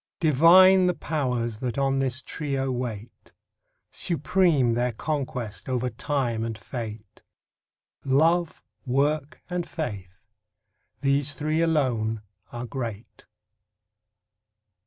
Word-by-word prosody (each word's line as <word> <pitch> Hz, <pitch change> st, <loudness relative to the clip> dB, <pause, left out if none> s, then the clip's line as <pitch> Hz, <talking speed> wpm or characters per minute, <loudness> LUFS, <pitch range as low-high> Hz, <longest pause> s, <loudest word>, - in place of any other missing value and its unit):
Divine 180 Hz, +5 st, +6 dB
the 180 Hz, -, +1 dB
Powers 125 Hz, -7 st, -2 dB
that 125 Hz, -1 st, -3 dB
on 135 Hz, -1 st, +1 dB
this 130 Hz, -1 st, -1 dB
trio 135 Hz, -3 st, -2 dB
wait. 120 Hz, -3 st, -6 dB, 0.6 s
Supreme 165 Hz, -6 st, +2 dB
their 120 Hz, +1 st, 0 dB
conquest, 125 Hz, -5 st, -4 dB
over 125 Hz, -1 st, -1 dB
Time 120 Hz, -2 st, -1 dB
and 115 Hz, -1 st, -4 dB
Fate. 110 Hz, -1 st, -8 dB, 0.8 s
Love, 160 Hz, +5 st, +2 dB, 0.2 s
Work, 140 Hz, +2 st, -1 dB
and 180 Hz, -1 st, -3 dB
Faith—these 105 Hz, -, -4 dB
three 155 Hz, +2 st, 0 dB
alone 120 Hz, -9 st, 0 dB, 0.3 s
are 120 Hz, 0 st, -5 dB
great. 115 Hz, -4 st, -7 dB
130 Hz, 95 wpm, -25 LUFS, 115-155 Hz, 0.8 s, Divine